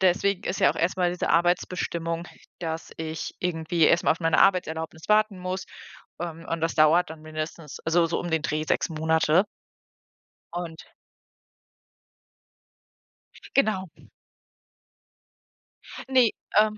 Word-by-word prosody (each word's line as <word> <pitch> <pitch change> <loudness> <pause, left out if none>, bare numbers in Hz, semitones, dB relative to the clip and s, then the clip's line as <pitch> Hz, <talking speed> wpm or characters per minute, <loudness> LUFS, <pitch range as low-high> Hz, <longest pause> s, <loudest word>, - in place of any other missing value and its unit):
deswegen 190 +1 +2
ist 190 - -2
ja - - +6
auch - - -6
erst 170 +3 0
mal 180 -1 +2
diese 180 - -2
Arbeitsbestimmung, 170 -1 0 0.3
dass 165 -1 -4
ich 160 0 -5
irgendwie 165 -1 0
erst 170 +3 +4
mal - - +5
auf 165 - -9
meine 165 -1 +2
Arbeitserlaubnis 160 -4 +1
warten 215 -2 +3
muss, 185 +1 -4 0.6
ähm, 165 -1 -6
und 165 0 -2
das 165 - 0
dauert 155 +2 +4
dann 160 -1 -9
mindestens, 155 -1 -6
also 165 +1 +3
so 165 - -1
um 175 - -4
den 160 -1 +1
Dreh 155 -1 -1
6 - - 0
Monate. 160 +2 +2 1.1
Und 170 -2 -6 2.7
Genau. 210 -8 +2 2.2
Ne, 255 -3 +5 0.3
ähm 215 0 +4
170 Hz, 125 wpm, -26 LUFS, 160-180 Hz, 2.7 s, ja